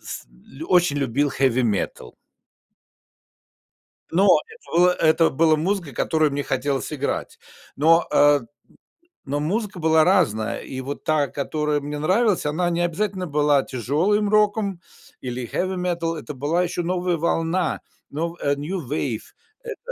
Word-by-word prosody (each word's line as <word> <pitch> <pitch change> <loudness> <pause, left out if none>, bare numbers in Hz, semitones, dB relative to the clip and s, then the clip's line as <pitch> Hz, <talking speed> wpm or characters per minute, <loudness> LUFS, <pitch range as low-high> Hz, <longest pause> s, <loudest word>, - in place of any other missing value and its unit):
с - - -8 0.4
очень 175 -5 +3
любил 140 +2 0
хеви-метал. 125 -6 -1 2.0
Но 190 +4 +3 0.2
это 445 - -13
было 180 +1 +6
это 160 -1 +3
было 155 +2 +3
музыка, 170 -2 -2
которую 155 -3 +1
мне 145 0 -1
хотелось 135 +3 -2
играть. 140 -1 -3 0.4
Но, 165 +4 +4
э, 145 0 +5 0.8
но 145 +1 -2
музыка 195 +5 -2
была 160 0 +4
разная, 115 - +1
и 130 -1 -7
вот 140 +2 -6
та, 150 -2 +1
которая 150 +1 -2
мне 145 +1 -5
нравилась, 190 +3 +1
она 165 +4 0
не 170 0 -1
обязательно 185 +2 -2
была 145 -2 +2
тяжелым 160 - 0
роком 205 -3 +1 0.4
или 125 -1 -5
хеви-метал, 175 0 -2
это 150 -1 -7
была 150 +7 0
еще 175 0 -2
новая 180 0 -1
волна, 165 +2 0 0.3
но 165 +4 -3
э, 140 - +1
New 170 +6 -4
Wave. 135 -6 -2 0.5
Это, - - -8
160 Hz, 135 wpm, -23 LUFS, 145-180 Hz, 2.0 s, было